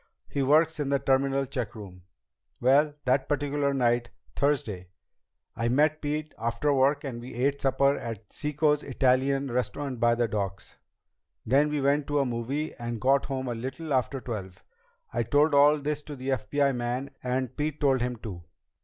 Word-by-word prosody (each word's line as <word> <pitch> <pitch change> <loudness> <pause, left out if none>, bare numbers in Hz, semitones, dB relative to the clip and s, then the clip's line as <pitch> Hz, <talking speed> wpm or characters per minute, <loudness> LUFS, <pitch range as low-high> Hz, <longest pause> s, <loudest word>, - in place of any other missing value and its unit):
He 140 - -2
works 155 +4 +3
in 145 -2 -1
the 140 - +3
terminal 135 +1 +1
checkroom. 105 -8 -6 0.6
Well, 145 +4 +3
that 130 +1 +1
particular 145 -1 0
night, 120 -3 +1 0.3
Thursday, 115 -10 0 0.7
I 115 +1 0
met 150 +4 +2
Pete 150 +1 -3
after 115 +6 0
work 140 +2 +2
and 125 -4 -5
we 120 0 -9
ate 140 +3 0
supper 140 +1 +2
at 110 -3 -7
Cicco's 150 0 +1
Italian 135 0 +1
restaurant 130 +2 -2
down - - -12
by 120 +1 +4
the 120 0 +1
docks. 100 -3 -4 0.7
Then 140 +5 +3
we 150 -1 -1
went 140 +1 +2
to 145 - 0
a 140 - +3
movie 130 +6 -3
and 120 -1 -5
got 135 +4 +2
home 130 -2 -3
a 120 - -1
little 135 +6 -4
after 130 +1 0
twelve. 100 -7 -7 0.5
I 120 - +1
told 145 +6 +3
all 145 +2 +6
this 150 +1 -2
to 150 0 -8
the 130 0 -5
FBI 135 +3 +1
man, 125 +3 -3
and 130 0 -2
Pete 150 0 -2
told 135 -4 +2
him 125 0 -1
too." 100 -7 -8
135 Hz, 170 wpm, -27 LUFS, 120-145 Hz, 0.7 s, all